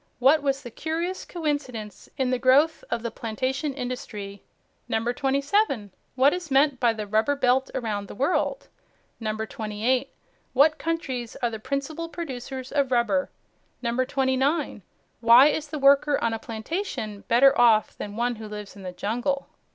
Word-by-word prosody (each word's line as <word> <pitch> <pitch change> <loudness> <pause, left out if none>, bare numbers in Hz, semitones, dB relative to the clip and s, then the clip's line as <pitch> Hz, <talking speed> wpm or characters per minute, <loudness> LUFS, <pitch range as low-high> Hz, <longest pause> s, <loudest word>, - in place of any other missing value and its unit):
What 275 +5 +5
was 275 -1 -1
the 240 - -8
curious 330 +8 -3
coincidence 285 - -4
in 260 -2 +1
the 255 - +1
growth 290 - +4
of 230 - -2
the 235 - -3
plantation 255 +7 -2
industry? 230 -6 -6 0.5
27. 270 - 0 0.2
What 270 +3 +5
is 360 -3 -5
meant 275 -1 +3
by 240 -2 +4
the 215 -2 -5
Rubber 220 +7 +1
Belt 260 -1 +2
around 215 -5 -2
the - - -9
world? 325 - 0 0.5
28. 220 +3 -1 0.4
What 300 +4 +4
countries 265 -8 -3
are 240 - +2
the 220 - -5
principal 295 +7 -3
producers 265 -5 -6
of 280 -3 +1
rubber? 255 +3 +2 0.6
29. 260 +3 0 0.4
Why 235 +4 +8
is 305 0 -2
the 300 - -5
worker 280 +1 +5
on 230 - 0
a 225 - -3
plantation 220 - -4
better 270 +4 +6
off 225 -3 +4
than 205 0 -7
one 240 +1 -1
who 220 0 -8
lives 210 -1 -8
in 200 - -11
the 185 -1 -6
jungle? 245 +9 -2
255 Hz, 150 wpm, -25 LUFS, 225-285 Hz, 0.6 s, Why